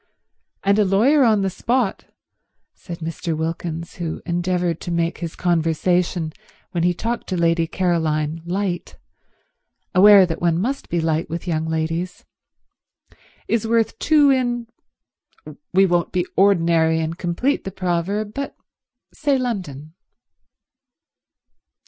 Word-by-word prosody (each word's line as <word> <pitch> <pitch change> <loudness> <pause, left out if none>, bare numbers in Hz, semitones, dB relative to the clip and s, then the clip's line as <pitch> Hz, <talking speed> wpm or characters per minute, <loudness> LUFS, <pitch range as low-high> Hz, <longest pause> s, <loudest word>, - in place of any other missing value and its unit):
And 200 +2 +3
a - - +5
lawyer 230 +10 +4
on 215 -4 +3
the 195 - +1
spot," 235 +1 -1 0.7
said 170 -1 -9
Mr. 165 0 -3
Wilkins, 165 +1 -4
who 165 -2 -4
endeavoured 175 -1 -1
to - - -6
make 170 0 -1
his 170 -2 -5
conversation 170 0 0 0.4
when 170 - -1
he 175 - +3
talked 230 +7 -3
to 185 - -2
Lady 165 -1 +2
Caroline 160 -3 -1
light, 180 0 -3 1.0
aware 200 0 +8
that 165 -2 -5
one 170 -1 +2
must 265 +8 -3
be 170 - 0
light 160 0 -1
with 170 +1 -5
young 160 -2 -1
ladies, 165 +3 -3 1.2
"is 225 -1 0
worth 230 -1 +1
two 295 -2 +4
in—we 240 -3 -3
won't 175 -2 +1
be 180 -1 0
ordinary 165 -4 +3
and 160 +2 -3
complete 185 +11 -1
the - - -4
proverb, 190 +3 -2
but 280 0 -5 0.6
say 285 -3 +1
London." 180 - -4
175 Hz, 125 wpm, -21 LUFS, 165-205 Hz, 1.2 s, aware